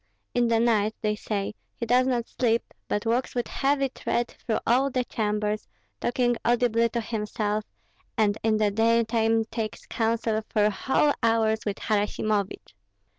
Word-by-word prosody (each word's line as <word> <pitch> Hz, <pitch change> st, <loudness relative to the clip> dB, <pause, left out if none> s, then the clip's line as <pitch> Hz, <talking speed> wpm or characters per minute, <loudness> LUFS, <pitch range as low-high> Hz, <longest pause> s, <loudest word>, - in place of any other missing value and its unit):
In 245 Hz, -1 st, +2 dB
the 230 Hz, -1 st, +3 dB
night, 220 Hz, -2 st, +2 dB
they 210 Hz, 0 st, +1 dB
say, 210 Hz, -1 st, -3 dB, 0.2 s
he 235 Hz, -, -4 dB
does 250 Hz, +2 st, +3 dB
not 240 Hz, -3 st, 0 dB
sleep, 230 Hz, -2 st, 0 dB
but 205 Hz, -, -1 dB
walks 240 Hz, +4 st, 0 dB
with 240 Hz, -, -1 dB
heavy 275 Hz, 0 st, +1 dB
tread 240 Hz, -1 st, -2 dB
through 220 Hz, -, -3 dB
all 260 Hz, +4 st, +3 dB
the 255 Hz, -1 st, 0 dB
chambers, 210 Hz, -2 st, -2 dB, 0.3 s
talking 240 Hz, 0 st, +1 dB
audibly 235 Hz, -1 st, +2 dB
to 235 Hz, +1 st, -2 dB
himself, 210 Hz, -1 st, -2 dB, 0.5 s
and 210 Hz, -2 st, +3 dB
in 220 Hz, -1 st, +2 dB
the 210 Hz, -1 st, +2 dB
daytime 225 Hz, +1 st, +2 dB
takes 225 Hz, -1 st, -5 dB
counsel 225 Hz, -1 st, 0 dB
for 210 Hz, -1 st, +3 dB
whole 270 Hz, +7 st, +2 dB
hours 225 Hz, -1 st, +2 dB
with 200 Hz, -, -1 dB
Harasimovich." 210 Hz, -, -1 dB
225 Hz, 150 wpm, -26 LUFS, 215-240 Hz, 0.5 s, the